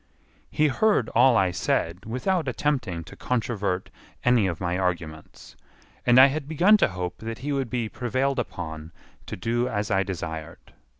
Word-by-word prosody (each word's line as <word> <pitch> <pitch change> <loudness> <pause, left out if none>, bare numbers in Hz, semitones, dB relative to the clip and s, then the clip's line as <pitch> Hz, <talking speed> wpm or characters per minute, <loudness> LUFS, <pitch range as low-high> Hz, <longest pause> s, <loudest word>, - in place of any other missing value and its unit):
He 155 - +2
heard 200 - +2
all 120 0 +5
I 95 -2 +2
said 90 +1 -1
without 155 - -1
attempting 125 - -1
to - - -13
controvert 105 -6 -2 0.3
any 125 -5 +4
of 85 -3 -3
my 90 -1 -1
arguments, 85 -4 -4 0.5
and 120 0 +6
I 130 - +10
had 140 +1 -1
begun 175 +7 +5
to - - +3
hope 90 -3 -5
that 115 0 -5
he 145 - -1
would 135 -3 -1
be 120 -2 -2
prevailed 130 +4 -1
upon 80 -8 -6 0.4
to - - -5
do 120 +6 0
as 105 0 -2
I 95 -1 +3
desired. 80 -4 -6
115 Hz, 165 wpm, -25 LUFS, 90-130 Hz, 0.5 s, I